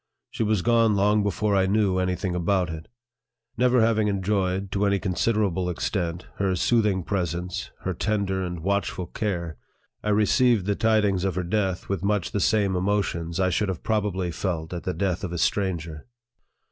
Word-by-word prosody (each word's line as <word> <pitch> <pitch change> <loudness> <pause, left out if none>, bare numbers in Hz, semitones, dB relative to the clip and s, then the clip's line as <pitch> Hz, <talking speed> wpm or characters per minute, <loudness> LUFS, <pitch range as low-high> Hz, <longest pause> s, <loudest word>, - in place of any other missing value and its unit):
She - - -5
was 105 -4 +1
gone 115 -2 +3
long 105 +2 +3
before 100 +1 0
I 95 -1 +3
knew 100 -2 +2
any 90 0 0
thing 90 +1 -3
about 90 0 0
it. 80 0 -7 0.7
Never 125 0 +3
having 110 -1 +3
enjoyed, 95 -1 -1
to 100 0 +1
any 100 0 +2
considerable 95 -1 0
extent, 85 -1 -2
her 95 -2 +1
soothing 105 -1 +2
presence, 90 -1 -3
her 95 - -2
tender 95 0 -1
and 90 -2 -4
watchful 100 0 -1
care, 85 -7 -3 0.5
I 105 - -1
re 105 +1 +3
ceived 120 -5 +3
the 100 - +1
tidings 105 -3 +2
of 95 -3 -1
her 90 - -1
death 95 0 -1
with 100 -3 -2
much 100 -2 0
the 105 - -1
same 100 -1 +2
emotions 90 -3 -1
I 95 -1 +2
should 100 +3 0
have 90 -4 -4
probably 100 -5 -1
felt 85 -1 -3
at 85 - -6
the 90 - -2
death 95 +1 -1
of 90 - -3
a - - -3
stranger. 85 -3 -1
95 Hz, 180 wpm, -25 LUFS, 90-105 Hz, 0.7 s, gone